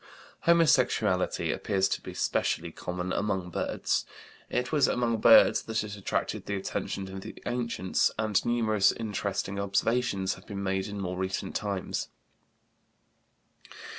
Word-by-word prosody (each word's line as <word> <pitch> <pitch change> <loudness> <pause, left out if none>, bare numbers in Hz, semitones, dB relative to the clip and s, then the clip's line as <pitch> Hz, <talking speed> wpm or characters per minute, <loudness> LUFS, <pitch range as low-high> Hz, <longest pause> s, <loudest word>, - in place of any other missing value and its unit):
Homosexuality 125 - +3
appears 95 -2 +1
to - - -2
be - - -8
specially 85 0 0
common 90 +2 -4
among 95 -4 -1
birds. - - -1 0.5
It 125 0 -1
was 150 -3 +4
among 120 -2 +1
birds - - +7
that 110 -1 -2
it 105 -1 -6
attracted 100 - -3
the 100 - -1
attention 95 0 -3
of 95 - -6
the - - -9
ancients, 115 -6 0
and 110 -2 +1
numerous 110 -4 +3
interesting 100 -2 -3
observations 100 0 0
have - - -14
been 100 -2 -5
made 95 0 -1
in 100 0 -6
more 90 -1 -3
recent 95 0 -3
times. 100 -3 -2
100 Hz, 135 wpm, -28 LUFS, 95-115 Hz, 0.5 s, birds